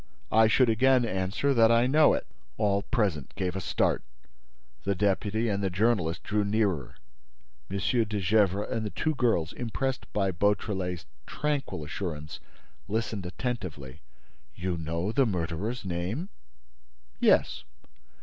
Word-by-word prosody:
"I 110 0 +6
should 125 +3 +4
again 125 +2 +4
answer 95 +7 0
that 115 -2 +5
I 115 +1 +5
know 150 +3 +5
it." - - -4 0.3
All 100 -2 +2
present 100 - -1
gave 95 -2 -2
a 95 - -2
start. - - +1 0.8
The 100 0 0
deputy 105 +3 +1
and 100 -2 0
the 95 - 0
journalist 95 -4 +1
drew 105 0 0
nearer. 100 -6 0 0.7
M. 100 - -2
de 105 +2 0
Gesvres 100 +1 +2
and 115 - -1
the 105 - -2
two 155 +9 -1
girls, 115 - +1
impressed 130 +2 -3
by 100 -2 +1
Beautrelet's 95 - -1 0.2
tranquil 145 - -2
assurance, 75 -2 -5 0.5
listened 110 -2 -2
attentively. 90 - -5 0.5
"You 90 0 -2
know 85 +4 -2
the 135 +1 +3
murderer's 95 +5 -3
name?" 95 - -3 0.9
"Yes." - - +3
100 Hz, 130 wpm, -28 LUFS, 90-115 Hz, 0.9 s, I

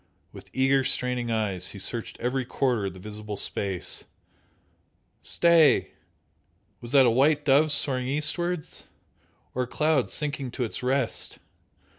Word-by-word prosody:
With - - -13
eager 135 +1 +2
straining 125 -2 -1
eyes 100 -5 -1
he - - -7
searched 115 +4 -1
every 125 +2 -1
quarter 120 -5 0
of 95 - -6
the - - -11
visible 105 +1 -6
space 95 -2 -3 1.2
stay! 165 -5 +4 0.9
Was 120 - -8
that 135 -2 +7
a 120 - +4
white 145 +5 +3
dove 145 +2 +4
soaring 130 -3 0
eastwards? 150 +4 -2 0.7
or 130 - -1
a 125 - -2
cloud 150 +2 +1
sinking 145 -3 -3
to 130 - -2
its 115 - -4
rest? 130 -1 -1
130 Hz, 135 wpm, -26 LUFS, 115-145 Hz, 1.2 s, that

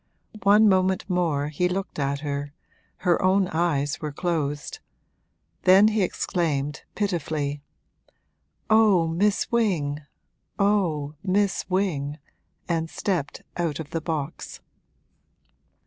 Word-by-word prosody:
One 210 +2 +6
moment 190 -1 +2
more 165 -6 0
he 180 +4 0
looked 190 -3 -4
at 140 0 -1
her 145 -1 -4 0.5
her 175 -2 +3
own 190 +1 +3
eyes 150 -4 0
were 150 -1 -3
closed; 150 -3 -2 0.8
then 195 +3 +6
he 220 -1 0
exclaimed, 150 -5 -1
pitifully, 155 -7 -2 1.1
'Oh 215 -6 +4
Miss 195 +5 +1
Wing, 170 -11 0 0.6
oh 175 -8 +1
Miss 195 +1 0
Wing!' 155 -7 -1 0.5
and 165 -1 -1
stepped 175 -7 -3
out 165 -4 -1
of 155 -2 -7
the 165 - -2
box. 155 -2 -4
170 Hz, 105 wpm, -25 LUFS, 145-190 Hz, 1.1 s, One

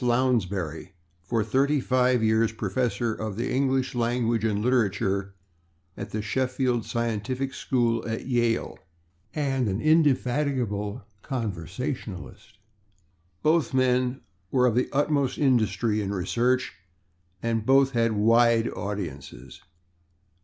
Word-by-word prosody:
Lounsbury, 110 - 0 0.3
for 110 +5 -1
thirty 140 +6 +2
five 125 -2 +2
years 110 0 +3
professor 115 +1 -1
of 110 -2 -5
the 120 +3 -2
English 130 0 +1
language 120 -2 0
and 105 -2 +1
literature 100 -4 0 0.6
in 100 - -6
the 105 0 -4
Sheffield 125 0 0
Scientific 120 +3 -2
School 120 -4 0
at 115 0 -4
Yale, 120 -3 0 0.6
and 135 -6 0
an 95 +2 -2
indefatigable 130 -7 +1 0.2
controversialist. 105 - -5 0.9
Both 155 -3 +2
men 130 0 +1 0.3
were 125 +1 +3
of 120 - +3
the 125 +3 +1
utmost 145 -1 +1
industry 110 -5 +1
in 100 -1 -3
research, 120 +7 0 0.7
and 115 -1 0
both 135 +3 +4
had 115 -2 +1
wide 115 +2 +4
audiences. 70 -10 -6
120 Hz, 110 wpm, -26 LUFS, 105-130 Hz, 0.9 s, both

